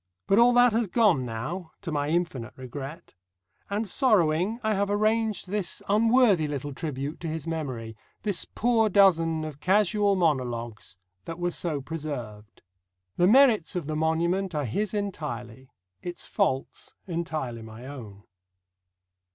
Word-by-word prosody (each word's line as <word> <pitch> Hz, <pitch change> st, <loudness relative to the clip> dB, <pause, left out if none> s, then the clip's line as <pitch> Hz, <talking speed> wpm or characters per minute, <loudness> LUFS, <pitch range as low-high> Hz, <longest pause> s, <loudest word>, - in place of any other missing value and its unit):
But 195 Hz, -, +4 dB
all 240 Hz, +1 st, +7 dB
that 245 Hz, -1 st, +5 dB
has 230 Hz, -1 st, +1 dB
gone 185 Hz, -, +3 dB
now, 155 Hz, +10 st, -5 dB
to 170 Hz, -, -4 dB
my 145 Hz, -1 st, -1 dB
infinite 160 Hz, -8 st, -2 dB
regret; 135 Hz, +6 st, -8 dB, 0.6 s
and 205 Hz, +2 st, -1 dB
sorrowing, 195 Hz, -, +2 dB
I 215 Hz, 0 st, +1 dB
have 200 Hz, 0 st, 0 dB
arranged 215 Hz, 0 st, +1 dB
this 200 Hz, -2 st, -3 dB
unworthy 215 Hz, -5 st, +4 dB
little 145 Hz, -1 st, -4 dB
tribute 145 Hz, 0 st, -4 dB
to 170 Hz, -, -5 dB
his 160 Hz, -2 st, -4 dB
memory, 130 Hz, -9 st, -4 dB, 0.3 s
this 200 Hz, -4 st, +1 dB
poor 225 Hz, -1 st, +1 dB
dozen 165 Hz, -5 st, +4 dB
of 150 Hz, -2 st, -8 dB
casual 205 Hz, +2 st, +2 dB
monologues 120 Hz, -, -2 dB, 0.3 s
that 165 Hz, -, -6 dB
were 175 Hz, 0 st, -1 dB
so 160 Hz, -5 st, -3 dB
preserved. 125 Hz, -9 st, -7 dB, 0.5 s
The 175 Hz, -, +4 dB
merits 225 Hz, -, +5 dB
of 175 Hz, -4 st, -2 dB
the 155 Hz, +1 st, -3 dB
monument 170 Hz, +4 st, 0 dB
are 145 Hz, -2 st, 0 dB
his 205 Hz, -, -2 dB
entirely; 130 Hz, -, -5 dB, 0.3 s
its 175 Hz, 0 st, -6 dB
faults 135 Hz, -10 st, -2 dB
entirely 155 Hz, -9 st, -3 dB
my 110 Hz, +2 st, -10 dB
own. 110 Hz, -8 st, -9 dB
165 Hz, 140 wpm, -27 LUFS, 135-200 Hz, 0.6 s, all